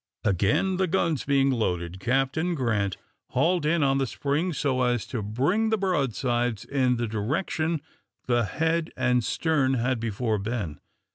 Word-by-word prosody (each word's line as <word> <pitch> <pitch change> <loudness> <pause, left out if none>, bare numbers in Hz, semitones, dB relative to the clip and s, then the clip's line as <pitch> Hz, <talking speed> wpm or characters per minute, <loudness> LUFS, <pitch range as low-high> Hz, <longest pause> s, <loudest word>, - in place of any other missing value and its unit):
Again, 105 - +2
the 190 0 +1
guns 165 -4 0
being 140 -1 +3
loaded, 90 -7 -1
Captain 135 - 0
Grant 105 - 0 0.4
hauled 165 +4 +2
in 165 -1 +2
on 135 0 +2
the 135 - 0
spring 145 +9 -1
so 140 -4 0
as 120 -2 +1
to 115 - -4
bring 140 - +1
the 220 - +2
broadsides 125 - 0
in 130 -3 +1
the 120 - -1
direction 150 - -1 0.4
the 120 -2 +2
head 165 - 0
and 125 -2 +2
stern 135 +2 +1
had 125 0 0
before 110 -1 -1
been. 105 -7 -3
130 Hz, 150 wpm, -26 LUFS, 115-160 Hz, 0.4 s, being